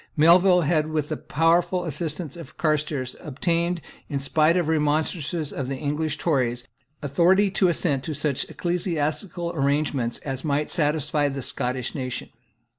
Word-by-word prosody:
Melville 180 +3 +6
had, 155 -1 +1
with 155 -2 -1
the 155 - -1
powerful 170 +4 +1
assistance 155 0 -4
of 170 -2 -11
Carstairs, 150 -5 -1
obtained, 170 +4 -1 0.3
in 145 - -1
spite 155 +5 +3
of 175 - +1
the 160 - 0
remonstrances 155 0 0
of 135 -1 -4
English 150 +2 -2
Tories, 125 -8 0 0.4
authority 180 +8 +3
to 190 - +3
assent 150 -5 +1
to 155 - -3
such 145 -2 -1
ecclesiastical 170 0 -2
arrangements 140 -5 0
as 135 -2 -3
might 150 0 0
satisfy 150 -2 +1
the 135 -1 -5
Scottish 125 -1 -2
nation. 130 -3 -4
155 Hz, 140 wpm, -24 LUFS, 140-170 Hz, 0.4 s, Melville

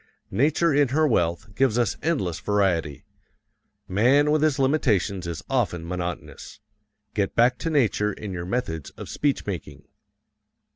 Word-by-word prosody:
Nature 150 - +2
in 145 0 +4
her 155 +5 +2
wealth 85 - 0
gives 125 0 +2
us 120 -4 +1
endless 95 - -1
variety; 90 -8 0 0.8
man 130 +10 +3
with 155 -1 +2
his 155 -3 +2
limitations 110 - +1
is 85 -2 -5
often 90 -11 -1
monotonous. 90 -1 -6 0.5
Get 100 -2 -1
back 125 +2 +3
to 165 - -2
nature 110 -8 +2
in 100 -1 -7
your 85 -1 -5
methods 90 - -3
of - - -8
speech 145 -2 -1
making. 95 -7 -6
105 Hz, 140 wpm, -24 LUFS, 90-140 Hz, 0.8 s, in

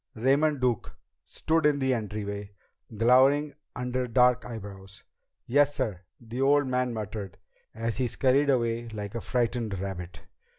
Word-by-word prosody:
Raymond 140 +5 +2
Duke 125 -4 -1 0.3
stood 160 +1 0
in 145 -1 +2
the 130 -1 +1
entryway, 105 -2 -4 0.4
glowering 135 +6 +4 0.2
under 125 0 -2
dark 125 +1 +3
eyebrows. 100 -4 -9 0.4
"Yes, 145 +2 +3
sir," 110 -9 -2 0.2
the 120 +2 -6
old 145 +1 +4
man 125 -1 0
muttered, 105 -4 -6 0.4
and 115 +1 -2
he 125 +1 -1
scurried 135 +4 +2
away 115 -2 +1
like 105 -3 -6
a 115 - -4
frightened 120 -4 -1
rabbit. 90 -5 -6
120 Hz, 135 wpm, -27 LUFS, 105-130 Hz, 0.4 s, glowering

